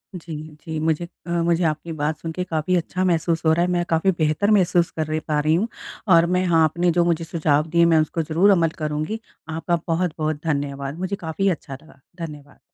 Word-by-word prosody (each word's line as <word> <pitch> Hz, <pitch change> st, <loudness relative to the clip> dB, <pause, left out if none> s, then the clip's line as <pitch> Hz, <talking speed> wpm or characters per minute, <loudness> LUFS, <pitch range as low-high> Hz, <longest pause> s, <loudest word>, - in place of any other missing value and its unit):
जी, 165 Hz, -2 st, -7 dB, 0.3 s
जी 160 Hz, -1 st, -3 dB
मुझे 160 Hz, +2 st, 0 dB, 0.2 s
अ, -, -, -6 dB
मुझे 170 Hz, 0 st, +1 dB
आपकी 160 Hz, +1 st, -1 dB
बात 155 Hz, 0 st, -2 dB
सुन 165 Hz, -, -5 dB
के 180 Hz, +3 st, -3 dB
काफ़ी 165 Hz, 0 st, -1 dB
अच्छा 180 Hz, +2 st, -1 dB
महसूस 165 Hz, -1 st, +1 dB
हो 160 Hz, -, +5 dB
रहा 170 Hz, +2 st, +2 dB
है। 180 Hz, -, -1 dB
मैं 175 Hz, -1 st, +1 dB
काफ़ी 165 Hz, +4 st, +3 dB
बेहतर 155 Hz, +7 st, +2 dB
महसूस 180 Hz, -4 st, +3 dB
कर 155 Hz, -, -2 dB
रही, 155 Hz, 0 st, -1 dB
पा 150 Hz, -1 st, -1 dB
रही 155 Hz, +1 st, +2 dB
हूँ 200 Hz, +7 st, +1 dB, 0.5 s
और 165 Hz, 0 st, +6 dB
मैं 185 Hz, -, +1 dB
हाँ 165 Hz, -2 st, +4 dB
आपने 170 Hz, +3 st, +2 dB
जो 175 Hz, +1 st, +3 dB
मुझे 170 Hz, -1 st, +1 dB
सुझाव 155 Hz, -2 st, +1 dB
दिए 170 Hz, +1 st, +4 dB
मैं 165 Hz, -1 st, +4 dB
उसको 155 Hz, +2 st, -2 dB
ज़रूर 165 Hz, +6 st, +3 dB
अमल 170 Hz, -4 st, +3 dB
करूँगी। 155 Hz, +7 st, -2 dB, 0.3 s
आपका 165 Hz, +2 st, -1 dB
बहुत-बहुत 155 Hz, -3 st, -1 dB
धन्यवाद। 140 Hz, -1 st, -2 dB
मुझे 185 Hz, +2 st, -2 dB
काफ़ी 185 Hz, +2 st, -1 dB
अच्छा 155 Hz, -5 st, -4 dB
लगा। 160 Hz, -, -19 dB, 0.3 s
धन्यवाद। 145 Hz, -2 st, -12 dB
165 Hz, 210 wpm, -22 LUFS, 155-175 Hz, 0.5 s, और